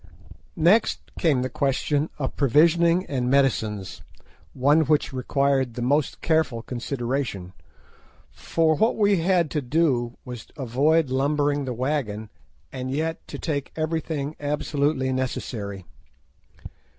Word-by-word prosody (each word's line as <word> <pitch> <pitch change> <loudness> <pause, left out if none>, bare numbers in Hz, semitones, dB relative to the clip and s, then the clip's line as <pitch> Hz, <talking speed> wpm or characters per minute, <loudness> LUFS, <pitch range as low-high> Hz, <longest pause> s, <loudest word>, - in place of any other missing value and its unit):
Next 180 +7 +2
came 145 -8 +2
the - - 0
question 140 +3 0
of 135 -3 -3
provisioning 170 +6 +4
and 125 -3 -2
medicines, 110 -7 0 0.5
one 145 +5 +4
which 150 -2 +1
required 135 -1 0
the 120 - -3
most 145 +3 0
careful 155 -8 +1
consideration, 120 -7 -3 0.8
for 160 -1 +1
what 220 +7 +2
we 205 -2 +3
had 175 -1 +2
to 150 - -1
do 125 -4 0
was 125 -3 -7
to - - -22
avoid 140 +4 +2
lumbering 145 +1 +1
the 130 - -3
wagon, 120 -5 -2 0.4
and 130 -1 -5
yet 160 +4 -3
to - - -7
take 145 -4 -3
everything 155 -2 -2
absolutely 145 -2 0
necessary. 105 -7 -4
140 Hz, 120 wpm, -24 LUFS, 125-155 Hz, 0.8 s, provisioning